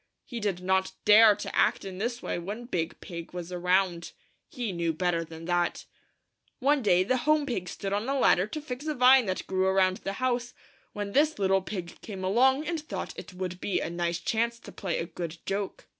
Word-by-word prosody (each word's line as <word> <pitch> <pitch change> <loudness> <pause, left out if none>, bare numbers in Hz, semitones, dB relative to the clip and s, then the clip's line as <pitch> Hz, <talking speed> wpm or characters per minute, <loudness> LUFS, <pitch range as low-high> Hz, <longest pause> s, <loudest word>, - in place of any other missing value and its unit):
He 240 - -6
did 200 -4 -2
not 190 0 +1
dare 210 0 +8
to - - -6
act - - +2
in 190 -1 -7
this 235 +3 -3
way - - -2
when 205 +7 -6
Big 170 -9 -3
Pig 170 -1 -8
was 175 0 -6
around. 180 -1 +1 0.4
He 245 -9 -3
knew 170 -2 -1
better 170 0 0
than 165 0 -10
that. 175 0 0 0.7
One 280 +2 +2
day 185 -5 +4
the 255 +7 +1
Home 305 +3 +2
Pig 190 -10 -3
stood 195 +3 -4
on 210 +5 -1
a 275 - +1
ladder 190 -7 +4
to 305 +8 -5
fix 285 0 -6
a 305 - -1
vine 250 -2 +6
that 185 - -2
grew 190 0 +1
around 190 -1 +3
the 195 - -4
house, 245 +1 -1 0.4
when 205 -1 -4
this 300 +6 +3
little 195 -1 +2
pig 180 -3 -6
came 195 -4 -7
along 265 +9 +3
and 335 0 -2
thought 310 - -5
it 180 - -10
would 180 -1 -5
be 200 - 0
a 165 - -3
nice 170 0 -1
chance 230 +6 -1
to - - -11
play 185 -5 -3
a - - -2
good 170 -1 -6
joke. 195 0 -3
195 Hz, 210 wpm, -28 LUFS, 180-240 Hz, 0.7 s, dare